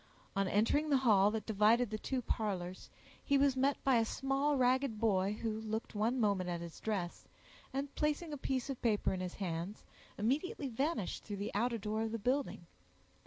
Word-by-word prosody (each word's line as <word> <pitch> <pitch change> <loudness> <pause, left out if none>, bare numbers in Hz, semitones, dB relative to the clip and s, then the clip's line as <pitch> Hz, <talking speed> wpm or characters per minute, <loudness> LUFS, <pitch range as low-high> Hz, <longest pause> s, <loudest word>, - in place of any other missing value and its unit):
On 195 0 +1
entering 230 +11 +2
the 280 - +5
hall 210 -6 +5
that 220 0 -3
divided 220 +2 +3
the 215 - -3
two 255 +1 -2
parlors, 185 -6 -3 0.3
he 280 - +3
was 275 -1 +3
met 275 +2 +2
by 265 -3 +4
a 230 - +4
small 270 +4 0
ragged 255 -2 +2
boy, 200 -3 +2
who 220 -1 -1
looked 220 +1 -4
one 225 +5 +1
moment 200 -5 +1
at 175 -1 -2
his 170 -1 -8
dress, 195 -6 -3 0.4
and 275 +1 -3
placing 300 +1 -1
a - - -1
piece 260 -2 -2
of 275 -3 -5
paper 215 -5 +1
in 185 - -3
his 180 -1 -4
hands, 180 +1 -4 0.3
immediately 275 - -1
vanished 265 - -2
through 205 -2 -5
the 200 +1 -4
outer 230 +3 +1
door 215 +1 -2
of 225 0 -2
the - - 0
building. 255 -4 -1
225 Hz, 190 wpm, -35 LUFS, 205-270 Hz, 0.4 s, the